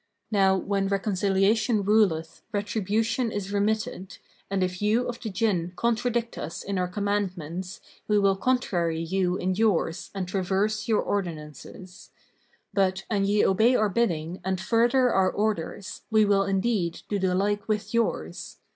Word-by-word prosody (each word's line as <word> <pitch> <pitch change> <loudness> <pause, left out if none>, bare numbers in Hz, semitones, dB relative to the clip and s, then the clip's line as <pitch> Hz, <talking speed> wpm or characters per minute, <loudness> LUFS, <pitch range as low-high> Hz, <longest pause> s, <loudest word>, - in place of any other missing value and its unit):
Now, 195 -2 +4
when 195 0 -1
reconciliation 200 +2 +1
ruleth, 190 -6 +2
retribution 220 +3 0
is 200 -1 -4
remitted, 205 -2 -1 0.3
and 195 -1 0
if 185 +1 -3
you 220 +4 +2
of 240 -1 -5
the 225 - -4
Jinn 185 -4 0
contradict 235 +2 -1
us 165 - -5
in 195 -1 -2
our 180 - 0
commandments, 185 -3 -3 0.3
we 210 - +3
will 195 -1 +3
contrary 180 -8 0
you 180 +2 0
in 185 +1 -1
yours 190 -5 0
and 190 -2 -3
traverse 200 +3 -1
your 220 -2 +2
ordinances; 180 0 -6 0.6
but, 190 -1 +1
an 200 -2 +2
ye 205 +1 +3
obey 220 +6 +4
our 215 -3 +2
bidding 180 -5 -1
and 190 0 -1
further 240 +5 +3
our 190 -1 +3
orders, 205 -2 -3
we 220 -2 +4
will 200 -1 +3
indeed 195 -3 -1
do 205 - -1
the 185 -1 +1
like 205 +2 0
with 210 -1 -2
yours. 85 - -2
200 Hz, 145 wpm, -26 LUFS, 185-215 Hz, 0.6 s, Now